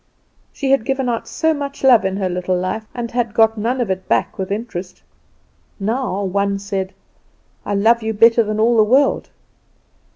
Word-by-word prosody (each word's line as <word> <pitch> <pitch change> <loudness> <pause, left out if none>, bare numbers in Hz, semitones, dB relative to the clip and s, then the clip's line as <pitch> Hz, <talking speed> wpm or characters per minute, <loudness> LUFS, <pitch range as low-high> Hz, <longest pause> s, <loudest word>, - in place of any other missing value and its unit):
She 270 -2 -2
had 275 -4 +3
given 265 +1 -1
out 235 -2 -2
so 320 0 0
much 280 -2 -6
love 250 -6 +6
in 190 0 -1
her 195 -2 -1
little 180 0 -1
life, 185 +4 -3
and 235 -2 -4
had 235 -3 -2
got 225 0 +4
none 235 +4 -1
of 230 -6 -1
it 190 0 -4
back - - 0
with 190 - -3
interest. 195 -4 -5 0.8
Now 215 -1 -2
one 200 +1 0
said, 195 -1 -4 0.7
"I 205 - -1
love 230 +4 +3
you 220 0 -2
better 230 +2 +5
than 215 0 -3
all 230 +2 +3
the 215 - +6
world." 265 +6 +2
220 Hz, 185 wpm, -19 LUFS, 195-240 Hz, 0.8 s, love